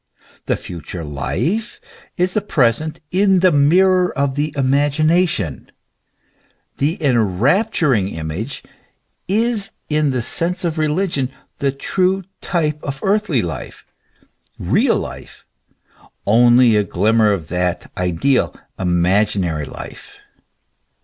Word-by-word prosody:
The -, -, +1 dB
future 85 Hz, 0 st, -7 dB
life 160 Hz, -, -2 dB, 0.4 s
is 180 Hz, 0 st, +1 dB
the 215 Hz, -, +1 dB
present 150 Hz, -, 0 dB
in 190 Hz, 0 st, +3 dB
the 185 Hz, -1 st, +5 dB
mirror 180 Hz, +5 st, +4 dB
of 140 Hz, -1 st, +1 dB
the 145 Hz, +2 st, -1 dB
imagination: 145 Hz, -, +1 dB, 1.1 s
the 155 Hz, +7 st, 0 dB
enrapturing 130 Hz, -, +2 dB
image 80 Hz, -, -5 dB, 0.6 s
is 220 Hz, 0 st, 0 dB, 0.2 s
in 150 Hz, -1 st, +1 dB
the 125 Hz, -3 st, -1 dB
sense 170 Hz, +10 st, 0 dB
of 160 Hz, -1 st, -2 dB
religion 155 Hz, -3 st, 0 dB, 0.3 s
the 140 Hz, -1 st, +1 dB
true 185 Hz, +7 st, 0 dB, 0.2 s
type 155 Hz, -4 st, -1 dB
of 140 Hz, -1 st, -5 dB
earthly 195 Hz, -, +1 dB
life, 80 Hz, -5 st, -7 dB, 0.7 s
real -, -, +2 dB
life -, -, -8 dB, 0.8 s
only 120 Hz, +2 st, +5 dB
a 105 Hz, -, +3 dB
glimmer 105 Hz, +4 st, +2 dB
of 85 Hz, -6 st, -3 dB
that 90 Hz, 0 st, -2 dB
ideal, 90 Hz, +10 st, 0 dB, 0.2 s
imaginary 90 Hz, -2 st, +1 dB
life. -, -, -10 dB
140 Hz, 105 wpm, -19 LUFS, -, 1.1 s, the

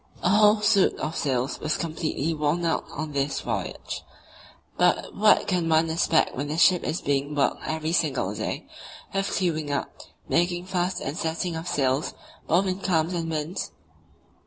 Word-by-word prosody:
A -, -, +3 dB
whole 210 Hz, +1 st, +5 dB
suit 205 Hz, -2 st, +4 dB
of 155 Hz, +2 st, -3 dB
sails 130 Hz, -2 st, -1 dB
was 155 Hz, -, -1 dB
completely 160 Hz, -1 st, -2 dB
worn 155 Hz, +3 st, 0 dB
out 165 Hz, -, 0 dB
on 155 Hz, +1 st, -5 dB
this 140 Hz, 0 st, -1 dB
voyage; -, -, -4 dB, 0.7 s
but -, -, +2 dB
what 210 Hz, +1 st, +4 dB
can 180 Hz, -4 st, 0 dB
one 160 Hz, 0 st, +3 dB
expect 165 Hz, 0 st, +2 dB
when 140 Hz, +3 st, -3 dB
the 150 Hz, +2 st, -3 dB
ship 180 Hz, +1 st, +5 dB
is 160 Hz, -, -2 dB
being 140 Hz, +1 st, -1 dB
worked 140 Hz, -, +1 dB
every 160 Hz, 0 st, -2 dB
single 140 Hz, -, 0 dB
day, -, -, -4 dB, 0.5 s
with 195 Hz, 0 st, 0 dB
clewing 160 Hz, -5 st, -1 dB
up, 140 Hz, -1 st, -3 dB, 0.3 s
making 175 Hz, +1 st, +1 dB
fast 185 Hz, -1 st, -1 dB
and 140 Hz, -, -3 dB
setting 165 Hz, -1 st, -2 dB
of 160 Hz, +2 st, -5 dB
sails 135 Hz, -2 st, 0 dB, 0.3 s
both 180 Hz, +4 st, +3 dB
in 185 Hz, 0 st, -1 dB
calms 170 Hz, -3 st, +1 dB
and 165 Hz, -2 st, -2 dB
winds? 155 Hz, +2 st, -3 dB
160 Hz, 165 wpm, -26 LUFS, 150-180 Hz, 0.7 s, whole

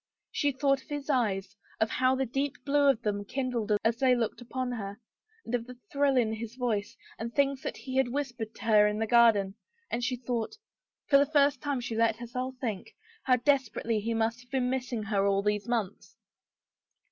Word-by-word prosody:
She 290 Hz, -2 st, +1 dB
thought 275 Hz, 0 st, +1 dB
of -, -, -23 dB
his 290 Hz, 0 st, -3 dB
eyes, 205 Hz, -6 st, 0 dB, 0.2 s
of 220 Hz, 0 st, +1 dB
how 255 Hz, 0 st, +3 dB
the 265 Hz, 0 st, 0 dB
deep 275 Hz, +3 st, -2 dB
blue 285 Hz, 0 st, +4 dB
of 240 Hz, -4 st, +1 dB
them 205 Hz, -1 st, -1 dB
kindled 245 Hz, -2 st, -2 dB
as 225 Hz, +1 st, +2 dB
they 255 Hz, -1 st, +4 dB
looked 235 Hz, 0 st, -2 dB
upon 250 Hz, +1 st, -3 dB
her, 205 Hz, -3 st, -5 dB, 0.5 s
and 230 Hz, -, -6 dB
of 240 Hz, -1 st, -1 dB
the 250 Hz, 0 st, -10 dB
thrill 280 Hz, -1 st, +2 dB
in 225 Hz, -3 st, +2 dB
his 225 Hz, +1 st, -6 dB
voice 225 Hz, -5 st, -2 dB, 0.2 s
and 230 Hz, +1 st, -4 dB
things 275 Hz, 0 st, +1 dB
that -, -, -4 dB
he 260 Hz, -1 st, -5 dB
had 265 Hz, -2 st, +4 dB
whispered 245 Hz, -4 st, -4 dB
to -, -, -11 dB
her 210 Hz, -2 st, +6 dB
in 210 Hz, 0 st, -1 dB
the 225 Hz, -, 0 dB
gar 235 Hz, 0 st, +7 dB
den, 195 Hz, -2 st, -2 dB, 0.4 s
and 240 Hz, -, -1 dB
she 255 Hz, +1 st, 0 dB
thought 240 Hz, -, -3 dB, 0.3 s
— -, -, -65 dB
for 280 Hz, -, +6 dB
the 285 Hz, +1 st, +1 dB
first 285 Hz, -3 st, +3 dB
time 285 Hz, -3 st, -1 dB
she 235 Hz, -2 st, -4 dB
let 225 Hz, 0 st, +3 dB
herself 250 Hz, +3 st, -5 dB
think 220 Hz, -7 st, -4 dB
— 450 Hz, -1 st, -28 dB
how 255 Hz, -, +5 dB
desperately 245 Hz, -4 st, +1 dB
he 230 Hz, +2 st, -2 dB
must 225 Hz, +2 st, 0 dB
have 245 Hz, -, -21 dB
been 255 Hz, -2 st, 0 dB
missing 250 Hz, -4 st, -2 dB
her 200 Hz, -2 st, +1 dB
all 195 Hz, 0 st, +2 dB
these 210 Hz, +1 st, 0 dB
months. 225 Hz, -5 st, -3 dB
245 Hz, 215 wpm, -29 LUFS, 220-265 Hz, 0.5 s, gar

